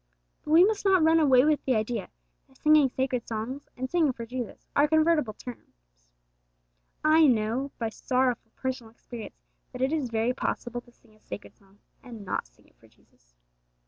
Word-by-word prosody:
But - - -10
we 340 +3 +8
must 425 0 -1
not 380 -4 +4
run 320 +1 +5
away 265 -4 +5
with 305 -1 +2
the 260 - +1
idea 220 +2 -2 0.4
that 265 -1 -25
singing 305 -3 +5
sacred 255 -1 -2
songs 235 +6 -5
and 260 +1 -3
singing 315 -3 +2
for 235 -1 -7
Jesus 245 0 -6
are 290 - +4
convertible 315 -6 +2
terms. 245 +1 -11 1.3
I 310 0 +6
know 235 +3 +1
by 225 -2 -2
sorrowful 250 -1 -1
personal 255 -3 -4
experience 230 0 -10 0.4
that 250 - -7
it 270 +4 +1
is 290 -6 -1
very 230 +2 0
possible 240 -1 -3
to 240 - -22
sing 230 -2 -26
a 215 - -25
sacred - - -9
song 195 0 -26 0.2
and 230 -6 -10
not 180 - -3
sing - - -28
it - - -30
for - - -22
Jesus. - - -32
255 Hz, 180 wpm, -27 LUFS, 230-300 Hz, 1.3 s, we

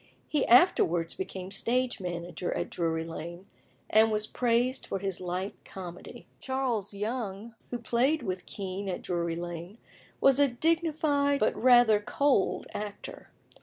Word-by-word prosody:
He 295 -3 0
afterwards 175 - +4
became 190 0 -6
stage 245 +4 0
manager 175 -1 -4
at - - -3
Drury 160 -1 -1
Lane, 170 +2 -7 0.4
and 220 +1 +4
was 215 0 +1
praised 245 +3 0
for - - -2
his 195 -1 -4
light 185 +2 -3
comedy. 180 -2 -9
Charles 255 -6 -1
Young, 210 0 -4 0.2
who 245 - -3
played 245 +6 +1
with 185 -3 -4
Kean 195 0 -5
at 180 - -4
Drury 170 -2 -1
Lane, 175 +3 -6 0.4
was 275 0 +4
a 285 - +6
dignified 295 0 +1
but 215 - +2
rather 240 -4 +6
cold 270 +1 +1
actor. 205 -1 -7
210 Hz, 135 wpm, -29 LUFS, 180-255 Hz, 0.4 s, a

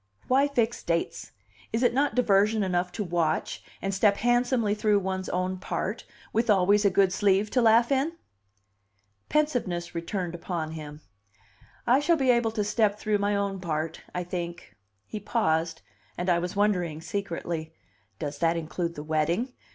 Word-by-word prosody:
"Why 270 +3 +4
fix 240 -5 0
dates? 170 0 -2 0.4
Is 225 +3 0
it 245 - +4
not 280 +2 +1
diversion 215 -2 +3
enough 180 -1 0
to 215 - -2
watch, 170 -3 -1 0.2
and 195 0 -1
step 200 +1 +3
handsomely 240 -2 +2
through 210 0 +2
one's 190 -1 -2
own 185 +1 -1
part, 205 +3 -3 0.3
with 225 +2 +1
always 205 +1 +4
a 200 - +5
good 190 -1 +3
sleeve 200 +1 +2
to 250 - +3
laugh 230 +2 +5
in?" 275 +5 +1 1.2
Pensiveness 230 - 0
returned 175 +1 -3
upon 170 -2 -4
him. 150 -1 -8 0.8
"I 250 +3 +5
shall 330 +3 +3
be 265 -3 +4
able 235 -2 +2
to 220 -1 -1
step 210 0 +1
through 210 -1 0
my 205 0 +1
own 200 -1 -1
part, 160 -2 -3
I 180 - -3
think." 170 - -6 0.3
He 215 - -6
paused, 165 -7 0 0.3
and 180 +1 0
I 170 - +3
was 180 +2 -4
wondering 180 -6 +1
secretly, 170 -4 -4 0.4
"Does 145 +3 -5
that 165 0 +2
include 170 +1 -3
the 150 - -6
wedding?" 165 - 0
195 Hz, 160 wpm, -27 LUFS, 170-225 Hz, 1.2 s, a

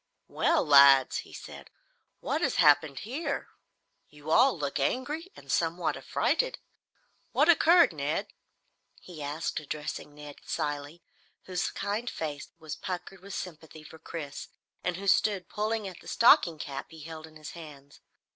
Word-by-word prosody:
"Well, - - +1
lads," 140 -2 +7
he - - -7
said, - - -10 0.5
"what - - -1
has - - +1
happened 145 -2 +4
here? 280 +6 -4 0.6
You 150 +1 -8
all 250 +3 +5
look 145 -2 -2
angry 295 - -2
and - - -9
somewhat - - 0
a - - -9
frighted. - - 0 0.8
What 300 - +4
occurred, 345 +1 +6
Ned?" - - -2 0.7
he 170 -4 -11
asked, 150 +3 -3
addressing 150 0 -6
Ned 150 -1 -10
Cilley, 145 +3 -4 0.4
whose 180 -1 -2
kind 210 +4 -3
face 150 -3 -5
was 160 -2 -7
puckered 185 +1 -6
with 200 +1 -8
sympathy 160 -3 -8
for 160 +1 -13
Chris 150 -3 -7 0.4
and 180 -1 -1
who 200 - -7
stood 200 -1 +2
pulling 215 0 -2
at 185 -3 -9
the - - -16
stocking 175 -8 +5
cap 140 -2 -6
he 160 -1 -12
held 160 +1 -8
in 155 - -18
his 155 -1 -9
hands. 145 -4 -12
160 Hz, 150 wpm, -29 LUFS, 150-205 Hz, 0.8 s, lads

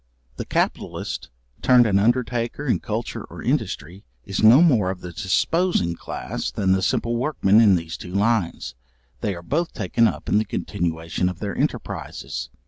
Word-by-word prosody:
The - - -4
capitalist, - - -2 0.3
turned 125 -1 +6
an 100 -3 +3
undertaker 120 +4 0
in 125 - +1
culture 110 +2 -4
or - - -10
industry, 85 +8 -2 0.2
is 100 - -2
no 115 +9 +8
more 120 - +3
of 95 -1 -5
the 90 - -7
disposing 105 - +1
class, - - -5
than 95 -2 0
the 95 0 +3
simple 115 +5 0
workmen 115 -6 +3
in 105 -4 +6
those 85 -1 -4
two 90 +1 -8
lines; 105 -4 0 0.5
they 105 -4 -2
are 85 - -9
both 165 - -1
taken 115 -1 +2
up - - -4
in 105 - +3
the - - +1
continuation 85 -1 -2
of 90 - -6
their 100 0 -4
enterprises. - - -4
105 Hz, 165 wpm, -23 LUFS, 90-120 Hz, 0.5 s, no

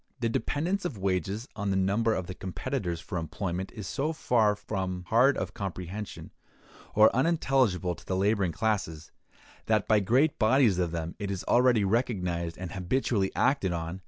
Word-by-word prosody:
The 115 -1 0
dependence 165 - -1
of 150 -11 -4
wages 95 - -2
on 100 -2 -2
the 95 - +1
number 105 +4 +2
of 90 - -3
the 95 - -6
competitors 95 - -4
for 90 +1 -4
employment 90 +3 -4
is 105 -4 -8
so 145 - -2
far 110 -8 +2
from 95 -3 -4
hard 130 +5 +4
of - - -3
comprehension, 95 +1 -6 0.6
or 110 +2 +6
unintelligible 130 - +2
to - - -14
the 95 - -1
laboring 100 -1 +1
classes, 95 -7 -2 0.6
that 110 -2 +2
by 110 -1 +4
great 130 +10 +2
bodies 110 -4 +4
of 90 -2 +1
them 85 0 -4
it 100 -2 -3
is 95 -2 -3
already 120 -3 +4
recognized 90 -6 -1
and 90 -2 -6
habitually 100 +1 0
acted 100 -10 +2
on. 85 +2 -4
100 Hz, 165 wpm, -28 LUFS, 90-120 Hz, 0.6 s, or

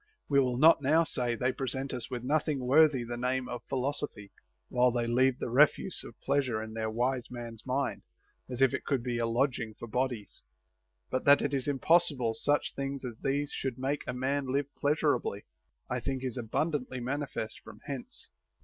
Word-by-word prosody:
We 140 -1 +4
will 125 -2 +1
not 155 +2 +6
now 155 +4 +4
say, 125 -7 -1
they 125 +3 +1
present 135 +1 -3
us 125 -2 -5
with 120 -2 -4
nothing 145 -1 0
worthy 140 -1 +5
the 120 0 -5
name 125 +1 -1
of 120 -1 -5
philosophy, 135 -6 -3 0.4
while 125 0 +3
they 120 -1 0
leave 130 +2 +3
the - - -4
refuse 150 +7 +3
of 120 - -12
pleas 140 0 +1
ure 110 -3 -1
in 110 0 -6
their 110 0 -2
wise 125 +2 -1
mans 120 -1 -8
mind, 135 +1 -1 0.5
as 130 +1 +1
if 135 - +4
it - - -2
could 135 -5 0
be 120 -1 -2
a 115 - +1
lodimia; 120 -2 0
for 120 - -7
bodies; 125 -3 -2 0.7
but 130 - 0
that 140 0 +7
it - - -1
is 135 -1 -1
impossible 145 -4 +3
such 145 +6 +1
things 140 -1 -4
as 120 -2 -7
these 140 +1 -1
should 130 -3 -3
make 135 +3 -1
a - - 0
man 135 +2 -1
live 140 +1 -1
pleasurably, 145 -8 0 0.4
I - - -1
think 135 -1 -3
is 130 -1 -3
abun 125 +7 -1
dantly 130 -3 -3
manifest 130 -3 -3
from 105 - -13
hence. 140 -4 -6
130 Hz, 195 wpm, -30 LUFS, 120-140 Hz, 0.7 s, that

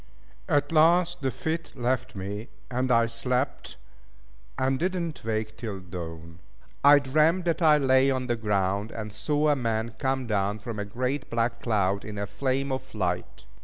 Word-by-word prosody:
At 145 -2 +2
last 170 +2 +4
the 135 - +1
fit 160 +5 -4
left 125 -2 -1
me, 100 +4 -5 0.2
and 125 +1 0
I 115 -1 +5
slept, 125 +3 -2 0.8
and 130 0 +1
did 185 +2 0
not 170 -3 -4
wake 110 -1 -2
till 105 -5 -5
dawn. 85 -2 -8 0.4
I 145 +1 +9
dreamt 155 +6 +2
that 170 0 0
I 155 -2 +6
lay 135 -1 +4
on 130 -1 0
the 120 -1 0
ground, 100 -1 0
and 105 -2 -6
saw 150 +7 +1
a 145 - +4
man 115 -3 -1
come 130 -1 0
down 105 -2 0
from 110 +1 -6
a 105 - -2
great 130 +6 -3
black 115 0 -1
cloud 100 -3 +1
in 105 0 -7
a 100 - -2
flame 130 +6 -1
of 130 -1 -5
light. 90 -8 -3
125 Hz, 170 wpm, -27 LUFS, 105-140 Hz, 0.8 s, I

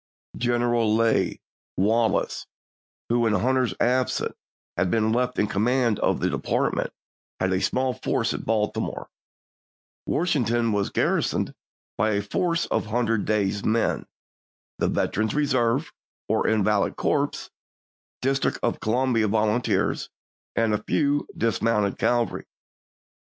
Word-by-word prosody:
General 120 -2 +1
Lew. 115 0 +2 0.4
Wallace, 110 +4 +1 0.6
who 120 0 +2
in 110 - +2
Hunter's 130 +3 +1
absence 125 0 +1 0.4
had 90 - +1
been 110 +3 +2
left 125 +1 0
in - - +3
command 115 +2 +1
of - - +1
the - - +1
department, - - -1 0.5
had 95 0 +1
a 95 - 0
small 130 0 +1
force 125 -2 -1
at - - -5
Baltimore; 105 -1 -2 1.0
Washington 120 - +1
was 100 -1 0
garrisoned - - 0 0.5
by 110 +1 +2
a 100 - +1
force 170 - 0
of - - -1
hundred 115 -1 0
days 100 -1 0
men 115 +1 0 0.3
— - - -98
the - - +2
Veteran 110 +2 0
Reserves 135 +1 +1 0.4
(or 110 +1 +1
invalid 105 -1 +2
corps), - - -1 0.7
District 135 +1 +1
of - - 0
Columbia 120 -1 +1
Volunteers, 110 +3 +1 0.5
and 115 -1 +2
a 105 - 0
few 145 +4 0
dismounted 115 -3 +1
cavalry. 120 -1 0
115 Hz, 120 wpm, -25 LUFS, 105-125 Hz, 1.0 s, in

